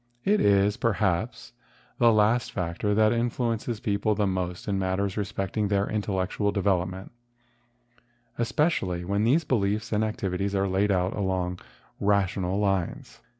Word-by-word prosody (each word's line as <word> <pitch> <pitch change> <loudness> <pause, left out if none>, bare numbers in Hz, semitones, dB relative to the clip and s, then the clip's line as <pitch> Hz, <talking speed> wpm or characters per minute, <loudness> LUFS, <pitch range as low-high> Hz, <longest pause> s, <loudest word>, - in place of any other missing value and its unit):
It 210 +2 +3
is, 100 0 +3
perhaps, 110 +2 -1 0.5
the 120 -1 +6
last 110 +3 +2
factor 90 +3 -1
that 110 +1 +4
influences 115 -1 -1
people 105 +1 0
most 90 -1 -3
in 100 -2 0
matters 95 +1 -1
respecting 100 0 -2
their 100 0 +1
intellect¬ 100 -3 -2
ual 100 -1 +2
development, 95 -1 -1 1.3
especially 115 - 0
when 100 +3 0
these 145 +8 +3
beliefs 105 -5 0
and 105 0 +1
activities 100 -2 -2
are 100 0 +1
laid 95 +2 +1
out 90 -1 +1
along 95 -2 -1 0.4
rational 100 -2 +1
lines. 95 -4 -2
100 Hz, 130 wpm, -26 LUFS, 95-110 Hz, 1.3 s, the